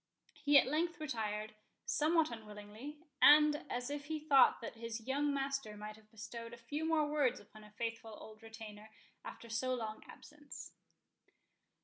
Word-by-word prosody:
He 290 -1 +6
at - - +7
length 320 +5 0
retired, 215 -7 -3 0.3
somewhat 315 0 +2
unwillingly, 215 +5 -9 0.2
and 300 0 +7
as 245 +2 -3
if 290 0 -4
he 310 +1 -3
thought 295 -3 +5
that 230 - -6
his 230 0 -6
young 285 +2 +1
master 275 -6 -2
might 210 0 -7
have 215 0 -20
bestowed 230 +2 -8
a - - -16
few 290 +7 -4
more 320 -2 +3
words 290 -4 +1
upon 215 +1 -15
a 210 - -14
faithful 225 0 -5
old 215 0 -12
retainer 220 -1 -10 0.3
after 235 - -9
so 255 +3 0
long 220 -3 -5
absence. 295 -1 -11
240 Hz, 155 wpm, -36 LUFS, 220-295 Hz, 0.3 s, at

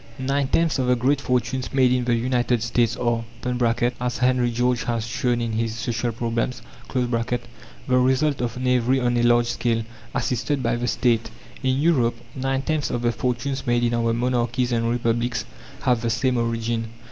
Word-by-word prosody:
Nine 135 +1 0
tenths 165 0 +1
of 130 - +1
the 125 - +4
great 135 +3 +1
fortunes 125 0 -1
made 130 -2 +4
in 125 -1 0
the 120 -1 +2
United 120 -1 +1
States 115 -1 +1
are 120 -1 0 0.8
(as 125 0 -1
Henry 125 -1 +2
George 125 +1 0
has 115 -2 -1
shown 120 +1 0
in 115 -1 -1
his 115 0 -1
"Social 120 -1 -2
Problems") 115 +2 -2 0.3
the 125 -2 0 0.8
result 130 +3 +2
of 120 -1 -2
knavery 125 0 +2
on 120 -1 +1
a 120 - +2
large 120 0 +4
scale, 115 -1 0 0.3
assisted 125 +3 -1
by 115 0 +1
the 120 +1 -2
State. 115 -2 +1 0.3
In 130 -1 +1
Europe, 135 -6 +2 0.2
nine 135 0 -1
tenths 155 -1 -1
of 120 - -2
the 120 - +3
fortunes 125 +3 -2
made 120 0 +2
in 120 0 +1
our 115 -1 +1
monarchies 120 +1 0
and 115 -1 +1
republics 120 0 0 0.4
have 125 -4 +2
the 115 - 0
same 125 +3 +1
origin. 115 0 -1
120 Hz, 175 wpm, -23 LUFS, 115-130 Hz, 0.8 s, the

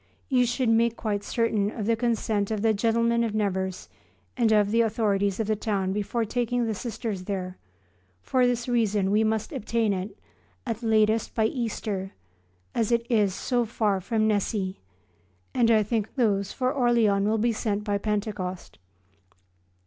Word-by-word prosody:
You 250 -3 +3
should 245 0 0
make 230 0 +3
quite 205 -2 -2
certain 225 -4 0
of 215 -1 -5
the 230 +1 +2
consent 220 -3 0
of 215 -1 -2
the 225 -1 +4
gentlemen 230 +2 +2
of 220 -2 -2
Nevers 190 -3 -2 0.5
and 235 -3 +2
of 210 -1 +3
the 230 +1 +4
authorities 205 -3 +1
of 220 - 0
the 215 +1 +1
town 195 -3 -1
before 210 +3 -1
taking 245 +2 -1
the 225 - -1
Sisters 215 -3 -5
there; 185 -2 -4 0.6
for 255 -1 +2
this 245 0 -1
reason 215 -5 +1
we 215 +2 +3
must 220 -1 -1
obtain 225 -1 0
it, 190 +2 -5 0.5
at 230 +1 -3
latest, 220 -1 +2
by 220 - +2
Easter, 215 -5 -3 0.6
as 225 0 0
it 235 0 +2
is 205 -5 +2
so 245 +3 0
far 210 -4 0
from 220 +2 0
Nessy, 200 -2 -1 0.7
and 235 -2 +3
I 220 -2 +5
think 220 0 -2
those 200 -6 +1
for 255 +1 -1
Orleans 230 -7 +2
will 220 +1 +2
be 230 +2 +1
sent 210 -2 -2
by 205 -1 -1
Pentecost. 205 -3 -3
220 Hz, 165 wpm, -26 LUFS, 200-230 Hz, 0.7 s, I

